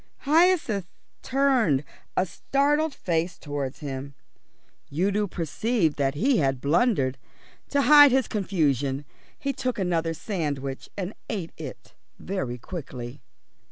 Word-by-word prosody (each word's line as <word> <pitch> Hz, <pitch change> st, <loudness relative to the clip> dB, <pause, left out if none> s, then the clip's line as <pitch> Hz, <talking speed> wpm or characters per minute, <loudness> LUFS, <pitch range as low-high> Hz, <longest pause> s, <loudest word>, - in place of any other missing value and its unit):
Hyacinth 305 Hz, -, +3 dB, 0.3 s
turned 250 Hz, -, +2 dB, 0.3 s
a 185 Hz, -, +4 dB
startled 290 Hz, -, +1 dB
face 170 Hz, 0 st, -1 dB
towards 145 Hz, -2 st, -4 dB
him. 140 Hz, -1 st, -5 dB, 0.8 s
Udo 200 Hz, +7 st, +1 dB
perceived 175 Hz, -, 0 dB
that 135 Hz, 0 st, +1 dB
he 250 Hz, -, +3 dB
had 135 Hz, -2 st, +1 dB
blundered. 140 Hz, -, +2 dB, 0.5 s
To 280 Hz, -1 st, +2 dB
hide 290 Hz, -1 st, +9 dB
his 260 Hz, -1 st, +2 dB
confusion 145 Hz, -, 0 dB, 0.3 s
he 275 Hz, 0 st, -2 dB
took 255 Hz, -2 st, -2 dB
another 170 Hz, -4 st, 0 dB
sandwich 145 Hz, -8 st, -3 dB
and 195 Hz, +1 st, -3 dB, 0.2 s
ate 190 Hz, -7 st, -3 dB
it -, -, -9 dB, 0.2 s
very 135 Hz, -11 st, -3 dB
quickly. 130 Hz, -3 st, -7 dB
175 Hz, 115 wpm, -26 LUFS, -, 0.8 s, hide